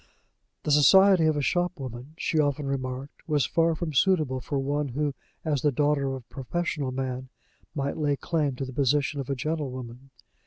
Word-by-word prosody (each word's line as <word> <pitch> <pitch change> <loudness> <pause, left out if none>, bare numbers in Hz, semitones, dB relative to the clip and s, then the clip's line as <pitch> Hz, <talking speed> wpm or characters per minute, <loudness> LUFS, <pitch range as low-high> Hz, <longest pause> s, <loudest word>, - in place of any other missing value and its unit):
The 150 - -1
society 185 +4 +6
of 155 -1 +2
a 145 - 0
shopwoman, 140 -6 -2
she 160 - 0
often 145 -1 +1
remarked, 135 0 -4
was 150 -3 +2
far 165 0 +2
from 155 -1 -4
suitable 145 -4 +2
for 140 - -3
one 145 +2 -1
who, 145 +3 -1 0.3
as 145 -4 0
the 150 - +3
daughter 145 +1 +1
of 135 - -1
a 130 - -7
professional 145 0 -2
man, 130 0 -4 0.5
might 140 -1 -2
lay 145 -2 +1
claim 150 -2 -1
to 135 - -3
the 130 - -8
position 140 +2 +1
of 135 - -8
a 140 - 0
gentlewoman. 130 -3 -4
145 Hz, 180 wpm, -27 LUFS, 130-155 Hz, 0.5 s, society